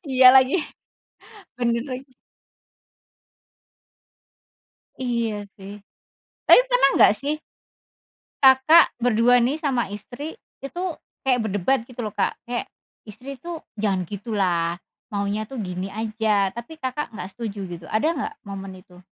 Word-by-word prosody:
Iya 255 Hz, 0 st, +6 dB
lagi, 260 Hz, +5 st, +5 dB, 1.0 s
benar 235 Hz, -1 st, +1 dB
lagi. 255 Hz, 0 st, -8 dB, 2.8 s
Iya 235 Hz, -3 st, -1 dB, 0.3 s
sih, 195 Hz, +1 st, -9 dB, 0.8 s
tapi -, -, +9 dB
pernah -, -, +5 dB
enggak -, -, +7 dB
sih 290 Hz, +2 st, -1 dB, 1.1 s
Kakak 265 Hz, +5 st, +7 dB
berdua 245 Hz, +1 st, +4 dB
nih 260 Hz, +6 st, +1 dB
sama 255 Hz, -9 st, -1 dB
istri, 245 Hz, -, -8 dB, 0.2 s
itu 275 Hz, +6 st, -6 dB, 0.4 s
kayak 255 Hz, -2 st, +3 dB
berdebat 205 Hz, +6 st, +1 dB
gitu 245 Hz, -2 st, -6 dB
loh, 210 Hz, -, -5 dB
Kak? -, -, -1 dB
Kayak 240 Hz, 0 st, -4 dB, 0.3 s
istri 250 Hz, +6 st, -9 dB
tuh, 340 Hz, -2 st, -7 dB, 0.2 s
"Jangan 190 Hz, -4 st, 0 dB
gitu 205 Hz, +5 st, -8 dB
lah, 170 Hz, -3 st, +1 dB, 0.3 s
maunya 205 Hz, +1 st, -2 dB
tuh 270 Hz, -, -7 dB
gini 185 Hz, -2 st, -4 dB
aja," 215 Hz, -2 st, 0 dB
tapi 240 Hz, +7 st, -9 dB
Kakak 265 Hz, +1 st, -3 dB
enggak 190 Hz, +1 st, -7 dB
setuju 210 Hz, -4 st, -5 dB
gitu. 175 Hz, -2 st, -8 dB
Ada 220 Hz, +8 st, +1 dB
enggak 425 Hz, +8 st, -4 dB
momen 195 Hz, -1 st, -7 dB
itu? 180 Hz, -1 st, -17 dB
235 Hz, 125 wpm, -23 LUFS, 200-265 Hz, 2.8 s, tapi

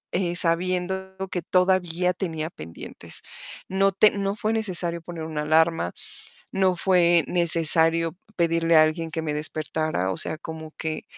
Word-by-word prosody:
eh, 175 Hz, -1 st, -1 dB
sabiendo 185 Hz, +2 st, 0 dB, 0.2 s
que 180 Hz, -, -2 dB
todavía 180 Hz, 0 st, +1 dB
tenía 165 Hz, -3 st, -4 dB
pendientes. 80 Hz, -, -8 dB, 0.4 s
No 195 Hz, +1 st, +2 dB
te 205 Hz, +3 st, +4 dB
no 200 Hz, 0 st, -2 dB
fue 215 Hz, +1 st, -1 dB
necesario 180 Hz, -6 st, -1 dB
poner 165 Hz, -1 st, -8 dB
una 155 Hz, -1 st, -4 dB
alarma, 160 Hz, -, +2 dB, 0.6 s
no 190 Hz, -2 st, +1 dB
fue 175 Hz, -3 st, +3 dB
necesario 165 Hz, -1 st, +4 dB, 0.2 s
pedirle 165 Hz, -1 st, +2 dB
a 155 Hz, -, +8 dB
alguien 160 Hz, +1 st, -2 dB
que 160 Hz, -, -3 dB
me 155 Hz, -2 st, -3 dB
despertara. 155 Hz, -, -2 dB
O 95 Hz, -, -2 dB
sea, 155 Hz, -, -3 dB
como 160 Hz, 0 st, -9 dB
que, 160 Hz, -1 st, -4 dB
170 Hz, 145 wpm, -24 LUFS, 160-185 Hz, 0.6 s, a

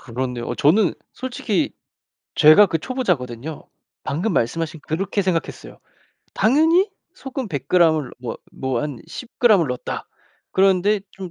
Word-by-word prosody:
그렇네요. 125 Hz, -1 st, -4 dB
어 -, -, -3 dB
저는 175 Hz, +5 st, +3 dB, 0.2 s
솔직히 255 Hz, +1 st, -2 dB, 0.6 s
제가 155 Hz, +6 st, +8 dB
그 165 Hz, -, -1 dB
초보자거든요. 155 Hz, -, -3 dB, 0.4 s
방금 180 Hz, +9 st, -1 dB
말씀하신 160 Hz, +6 st, -1 dB
그렇게 195 Hz, +5 st, -1 dB
생각했어요. 180 Hz, -3 st, -3 dB, 0.6 s
당연히 325 Hz, -, +3 dB, 0.2 s
소금 270 Hz, -, -6 dB
100g 160 Hz, +3 st, +3 dB
을 130 Hz, -5 st, -5 dB
뭐 120 Hz, -3 st, -5 dB, 0.2 s
뭐 130 Hz, -3 st, -2 dB
한 145 Hz, -5 st, -4 dB
10g 235 Hz, -5 st, +2 dB
을 -, -, -1 dB
넣었다. 125 Hz, 0 st, -5 dB, 0.4 s
그런데 195 Hz, +2 st, +3 dB
좀 190 Hz, -2 st, -8 dB
175 Hz, 275 characters per minute, -21 LUFS, 140-215 Hz, 0.6 s, 제가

